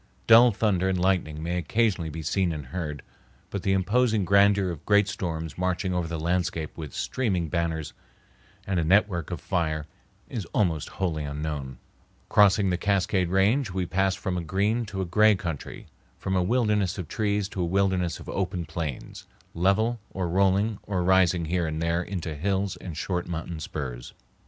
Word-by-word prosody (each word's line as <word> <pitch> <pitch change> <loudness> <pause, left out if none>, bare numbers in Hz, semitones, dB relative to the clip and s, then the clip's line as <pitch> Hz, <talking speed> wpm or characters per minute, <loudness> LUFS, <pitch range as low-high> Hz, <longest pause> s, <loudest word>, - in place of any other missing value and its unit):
Dull 115 +2 +8
thunder 100 -3 +1
and 95 -1 0
lightning 90 -5 0
may 90 +2 -1
occasionally 95 -1 0
be 80 +1 -6
seen 90 +2 +1
and 75 -3 -5
heard, 75 -1 -5 0.5
but 100 - -3
the 95 0 +1
imposing 110 +2 +2
grandeur 100 0 +4
of 80 - -8
great 105 -1 +4
storms 80 -5 -4
marching 90 +1 0
over 90 -2 -1
the 85 -1 -4
landscape 85 -1 -1
with 75 -5 -7
streaming 95 - -1
banners 80 -3 -2 0.7
and 95 -3 0
a - - +1
network 90 -1 +2
of 90 -3 -4
fire 80 -5 -1 0.4
is 110 -6 -4
almost 85 -7 +1
wholly 85 -5 -1
unknown. 70 -3 -4 0.5
Crossing 100 -1 +5
the 90 - +1
Cascade 95 -2 +1
Range, 105 +7 +2
we 90 0 -2
pass 95 +3 +1
from 95 -3 -3
a - - -5
green 105 +7 0
to 95 -1 -4
a - - -1
gray 105 +4 +4
country, 85 -6 -6 0.3
from 95 - -2
a 90 - +3
wilderness 105 -2 +1
of 90 -5 -5
trees 105 0 0
to 95 - -4
a - - +1
wilderness 95 -1 +1
of - - -11
open 90 -3 -2
plains, 80 -4 -6 0.3
level 105 +7 +2
or 95 -2 -3
rolling 100 +4 +2
or 95 -3 -2
rising 90 -2 +3
here 85 +1 0
and 80 0 -3
there 85 +1 0
into 90 -3 -4
hills 95 +5 -1
and 85 -5 -8
short 90 0 -2
mountain 85 -1 -5
spurs. 65 -6 -6
90 Hz, 175 wpm, -26 LUFS, 80-100 Hz, 0.7 s, Dull